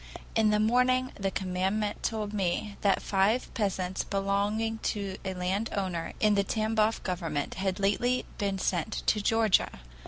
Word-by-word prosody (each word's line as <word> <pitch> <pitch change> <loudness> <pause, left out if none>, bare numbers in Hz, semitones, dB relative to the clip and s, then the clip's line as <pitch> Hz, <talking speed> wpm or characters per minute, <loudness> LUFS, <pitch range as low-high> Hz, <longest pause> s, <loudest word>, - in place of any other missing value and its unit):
"In 220 -1 +4
the 210 0 +3
morning 250 +3 +3
the 195 -1 -2
commandant 190 +3 -1
told 215 -2 -2
me 200 +1 -1
that 200 -1 +2
five 205 +5 +1
peasants 190 -3 -1
belonging 205 +3 0
to 200 -3 -2
a 190 -1 -3
landowner 185 -2 -2
in 215 -1 +4
the 200 -1 +3
Tamboff 220 +1 +1
government 165 -6 -2
had 190 0 -2
lately 240 +6 +1
been 200 -1 0
sent 185 +2 -1
to 210 - +2
Georgia. 225 -1 +3
200 Hz, 145 wpm, -29 LUFS, 190-220 Hz, -, In